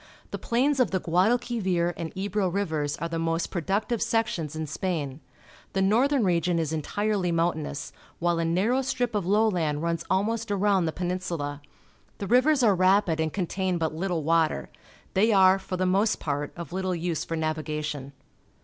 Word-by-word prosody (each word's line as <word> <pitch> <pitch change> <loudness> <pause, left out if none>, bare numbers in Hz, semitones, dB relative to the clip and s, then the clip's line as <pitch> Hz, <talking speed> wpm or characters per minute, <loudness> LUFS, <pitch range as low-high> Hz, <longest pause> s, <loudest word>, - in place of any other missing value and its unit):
The - - -4
plains 265 +4 +1
of 250 -7 +3
the 190 - 0
Guadalquivir 185 -1 +1
and 165 -1 -5
Eb7 200 +2 -4
o 190 - +2
Rivers 160 -6 -1
are 170 - -3
the 165 0 -3
most 165 +1 -1
productive 200 +6 -1
sections 225 -10 -1
in 160 0 -3
Spain. 150 -3 -3 0.5
The 195 - +1
northern 250 +6 +3
region 175 -2 +1
is 160 -1 -1
entirely 195 +4 -1
momitainous, 165 -3 -1 0.3
while 170 0 +1
a - - +1
narrow 200 +11 +2
strip 245 -2 -1
of 200 -4 -1
lowland 180 -8 +1
runs 170 0 -1
almost 220 +4 0
around 200 -2 +2
the 160 - 0
Peninsula. 175 -5 -3 0.6
The 200 - -4
rivers 255 +5 +4
are 215 -4 +5
rapid 185 -2 +3
and 160 -1 0
contain 185 0 -1
but 160 -2 -1
Uttle 175 -2 -2
water. 160 - +1 0.4
They 215 +4 +3
are, 190 -1 +6
for 190 -1 -5
the 185 - 0
most 200 +4 +2
part, 145 -1 -2
of 170 -4 -7
httle 185 -1 -2
use 170 -1 -2
for 165 - -4
navigation. 150 -3 -3
180 Hz, 170 wpm, -26 LUFS, 160-205 Hz, 0.6 s, are